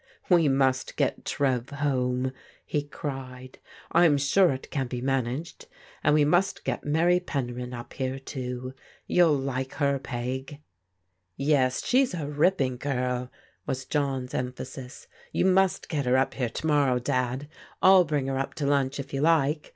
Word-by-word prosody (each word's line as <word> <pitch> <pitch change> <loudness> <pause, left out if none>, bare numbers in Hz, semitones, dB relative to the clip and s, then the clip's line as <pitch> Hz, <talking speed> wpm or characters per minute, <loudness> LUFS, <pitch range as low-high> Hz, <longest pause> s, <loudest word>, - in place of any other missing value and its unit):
We 170 -4 +5
must 135 -1 +1
get - - -1
Trev 130 -3 0
home! 130 -3 0 0.2
" - - -29
he 150 - -1
cried. 130 -3 -7 0.2
" - - -22
I*m 165 -4 +5
sure 170 +7 +4
it 130 0 -6
can 135 -3 -1
be 125 0 -4
managed 135 +4 -2 0.2
— - - -25
and 150 - +4
we 150 -1 +4
must 180 +6 +1
get - - -2
Mary 170 +4 +3
Penryn 125 -7 -4
up 120 -1 -8
here, 130 0 -3
too. 130 -1 -5 0.3
You'll 165 -5 +4
like 135 -1 -3
her. 140 -1 +1
Peg." 130 +3 -5 0.8
"Yes, 140 -3 +1
she's 255 -5 +3
a 155 -4 -4
ripping 145 -3 +1
girl," 125 -2 -2 0.4
was 130 0 -3
John's 135 -4 -2
emphasis. 125 +1 -6
" - - -26
You - - +1
must 190 0 +3
get 145 -6 -2
her 125 +1 +4
up 135 - +1
here 125 -3 -1
to 155 - -6
morrow. 145 -5 +3
Dad. 125 +1 -1 0.3
I'll 190 -1 +7
bring 145 -4 -1
her 135 0 -1
up 135 - -3
to 150 - -2
lunch 140 -1 +1
if 140 - -7
you 135 - -1
like. 155 -1 +2
135 Hz, 170 wpm, -27 LUFS, 130-150 Hz, 0.8 s, I'll